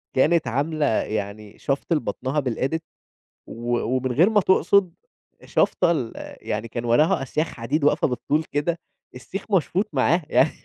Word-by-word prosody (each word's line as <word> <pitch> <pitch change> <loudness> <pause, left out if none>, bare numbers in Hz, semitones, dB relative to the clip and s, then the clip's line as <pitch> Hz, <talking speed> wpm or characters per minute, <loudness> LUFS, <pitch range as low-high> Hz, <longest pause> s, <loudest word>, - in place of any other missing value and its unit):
كانت 155 +1 +3
عاملة 145 +5 0
يعني 105 -2 -2
شفْط 140 +4 -1
لبطنها 150 -1 -1
بالEdit 130 +5 -1 0.7
و 120 +1 -2
ومن 130 +1 -1
غير 170 - +4
ما 210 -2 +3
تقصد 190 -1 +3 0.5
شافطه 170 - +2
ال 130 -9 -2 0.3
يعني 105 +2 -2
كان 120 +1 -5
وراها 150 +8 +3
أسياخ 155 +4 -1
حديد 140 +6 -3
واقفة 145 - +3
بالطول 145 +4 -1
كده، 165 +4 -1 0.4
السيخ 195 - -7
مشفوط 190 +2 +1
معاها 155 +5 +2
يعني 150 - +4
145 Hz, 140 wpm, -23 LUFS, 120-165 Hz, 0.7 s, غير